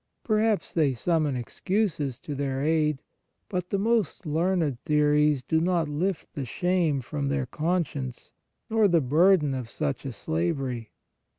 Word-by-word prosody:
Perhaps 215 -1 +1
they 150 -5 +2
summon 155 0 +1
excuses 150 - -1
to 150 - -5
their 135 -1 -2
aid, 150 -1 +1 0.5
but 180 -2 -3
the 200 - 0
most 210 -2 0
learned 160 -4 0
theories 150 -2 +3
do 160 +4 +1
not 170 -2 +1
lift 160 +4 -2
the 140 - -4
shame 165 +2 0
from 140 +3 -3
their 140 -1 0
con 170 +7 0
science, 130 -3 -7 0.4
nor 220 -2 +3
the 170 -3 +4
burden 155 +2 +4
of 125 -3 -4
such 145 -2 -2
a 135 - -4
slavery. 115 - -2
150 Hz, 150 wpm, -27 LUFS, 135-180 Hz, 0.5 s, the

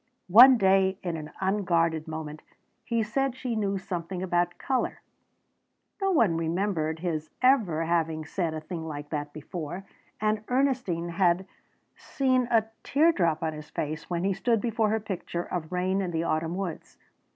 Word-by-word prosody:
One 250 +3 +10
day 190 -2 +3
in 175 -3 -2
an 155 -1 -6
unguarded 170 -5 +1
moment 155 -1 -6 0.4
he 230 -2 0
said 260 +4 -1
she 255 -3 -3
knew 200 -2 0
something 180 0 -4
about 175 -1 0
colour. 260 -1 -1 1.0
No 390 - +2
one 225 - +3
remembered 165 -1 -1
his 155 -3 -2
ever 205 - +3
having 160 -2 0
said 165 -1 -2
a 155 - -4
thing 160 0 -6
like 145 -1 -7
that 145 -1 -3
before. 160 +4 -6 0.3
And 215 0 0
Ernestine 250 -10 0
had 175 +1 +2 0.5
seen 255 -2 0
a 225 -2 +3 0.2
teardrop 190 - +2
on 160 -1 -1
his 150 0 -9
face 155 +2 -4
when 175 -1 -1
he 195 0 +2
stood 230 +3 +1
before 225 0 0
her 220 +1 +1
picture 185 -4 -4
of 175 -2 -5
rain 185 +2 0
in 185 - -2
the 165 -1 -1
autumn 165 +1 -1
woods. 190 -3 -5
180 Hz, 160 wpm, -27 LUFS, 160-215 Hz, 1.0 s, One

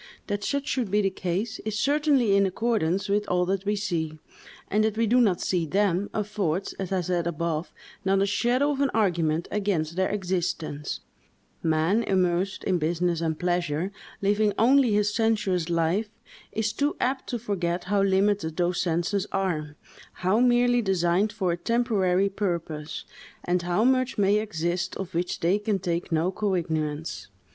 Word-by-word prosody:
That 205 -1 -3
such 280 +3 -1
should 245 -6 -1
be 210 +2 +2
the 195 - +1
case, 190 +6 -3
is 215 -1 -3
certainly 280 -4 +3
in 200 0 +4
accordance 195 -3 0
with 205 +1 0
all 180 0 +2
that 195 +1 -1
we 205 +1 +1
see; 170 -6 -2 0.5
and 215 +2 +2
that 220 0 0
we 230 - +3
do 245 +3 +4
not 195 -7 +2
see 175 -3 0
them, 195 +2 +1
affords, 200 -4 -2
as 190 -2 -4
I - - +1
have 180 -2 -1
said 175 -1 0
above, 170 0 -2 0.3
not 195 0 +2
a 195 - +3
shadow 245 +7 +1
of 280 -1 -2
argument 170 -6 +1
against 185 -6 -1
their 190 0 +1
existence; 175 -6 -2 0.6
man, 160 +7 +2
immersed 185 -2 0
in 185 -2 +1
business 170 +1 0
and 160 -2 -1
pleasure, 175 0 -1 0.3
living 205 +1 +2
only 255 +1 +5
his 205 0 +2
sensuous 205 -7 +1
life, 170 +6 +1 0.4
is 215 -1 -1
too 290 +2 0
apt 265 +2 -1
to 240 - -1
forget 185 -6 -2
how 200 +2 +1
limited 195 -4 +1
those 175 0 +1
senses 180 +4 0
are, 155 -6 -2 0.5
how 195 +5 +3
merely 245 0 +4
designed 190 0 +1
for 195 -4 -1
a 170 - -1
temporary 200 -2 +1
purpose, 170 -6 -3 0.4
and 180 0 +1
how 175 +4 +1
much 255 0 +2
may 205 0 +3
exist 175 -2 -2
of 190 -1 -6
which 175 +2 -2
they 180 +5 +2
can 210 -1 0
take 175 -2 -3
no 165 +3 +1
cognizance. 160 -6 -2
190 Hz, 165 wpm, -26 LUFS, 175-210 Hz, 0.6 s, only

